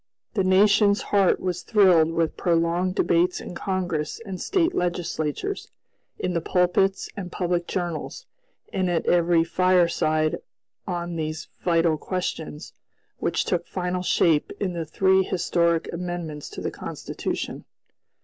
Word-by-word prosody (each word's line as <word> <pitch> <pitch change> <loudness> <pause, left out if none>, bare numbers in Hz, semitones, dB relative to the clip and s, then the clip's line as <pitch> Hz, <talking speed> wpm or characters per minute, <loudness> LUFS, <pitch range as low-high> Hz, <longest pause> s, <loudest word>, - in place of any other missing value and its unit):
The 195 - +1
nation's 200 +2 +4
heart 195 -2 +4
was 180 -1 -2
thrilled 185 -7 +5
with 165 -1 0
prolonged 175 +1 +1
debates 175 +2 +2
in - - -8
Congress 175 -5 -2
and 190 -3 -6
State 365 -3 +1
legislatures, 175 - -2 0.5
in 180 - -2
the 170 - 0
pulpits 180 +3 +1
and 185 -4 -6
public 175 -1 -1
journals, 175 - -4 0.5
and 185 -2 0
at 170 -2 0
every 170 -1 +4
fireside 170 -3 +2 0.5
on 175 -2 -3
these 155 0 -4
vital 165 -3 +2
questions, 165 -4 -4 0.5
which - - 0
took 175 -2 -1
final 180 0 -2
shape 165 -4 +2
in 190 -3 -1
the 165 -2 -4
three 190 +4 +3
historic 170 -2 +1
amendments 170 -4 -5
to - - -8
the - - -2
Constitution. - - -5
175 Hz, 130 wpm, -24 LUFS, 165-185 Hz, 0.5 s, thrilled